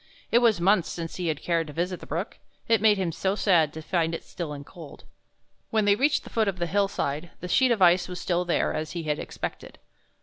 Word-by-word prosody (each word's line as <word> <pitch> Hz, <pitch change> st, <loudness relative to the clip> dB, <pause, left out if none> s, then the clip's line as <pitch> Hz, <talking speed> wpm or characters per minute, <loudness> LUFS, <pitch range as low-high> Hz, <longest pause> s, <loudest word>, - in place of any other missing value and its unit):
It 235 Hz, -, +6 dB
was 230 Hz, -6 st, +3 dB
months 190 Hz, 0 st, +3 dB
since 165 Hz, -1 st, -6 dB
he 180 Hz, -2 st, -2 dB
had 155 Hz, -2 st, -2 dB
cared 165 Hz, -2 st, 0 dB
to 150 Hz, -, -9 dB
visit 175 Hz, +3 st, -2 dB
the -, -, -12 dB
brook, 170 Hz, +8 st, -4 dB, 0.3 s
it 225 Hz, -3 st, +3 dB
made 215 Hz, -2 st, +5 dB
him 185 Hz, -3 st, -1 dB
so 190 Hz, +4 st, -1 dB
sad 170 Hz, -8 st, +3 dB
to 160 Hz, -, -8 dB
find 165 Hz, -1 st, 0 dB
it -, -, -7 dB
still 170 Hz, -4 st, -6 dB
and 145 Hz, -1 st, -7 dB
cold. 160 Hz, -4 st, -12 dB, 0.7 s
When 220 Hz, -2 st, +1 dB
they 205 Hz, -, +5 dB
reached 280 Hz, +7 st, +2 dB
the -, -, -12 dB
foot 220 Hz, -2 st, +1 dB
of 195 Hz, -2 st, -1 dB
the 175 Hz, -, -1 dB
hillside 175 Hz, -4 st, -1 dB
the 180 Hz, -, -6 dB
sheet 255 Hz, +8 st, +3 dB
of 225 Hz, -5 st, +3 dB
ice 175 Hz, 0 st, +5 dB
was 180 Hz, -1 st, -6 dB
still 175 Hz, -1 st, 0 dB
there, 175 Hz, -, 0 dB
as 155 Hz, 0 st, -4 dB
he 170 Hz, -2 st, -4 dB
had 150 Hz, -1 st, -1 dB
expected. -, -, -6 dB
175 Hz, 240 wpm, -26 LUFS, 165-200 Hz, 0.7 s, It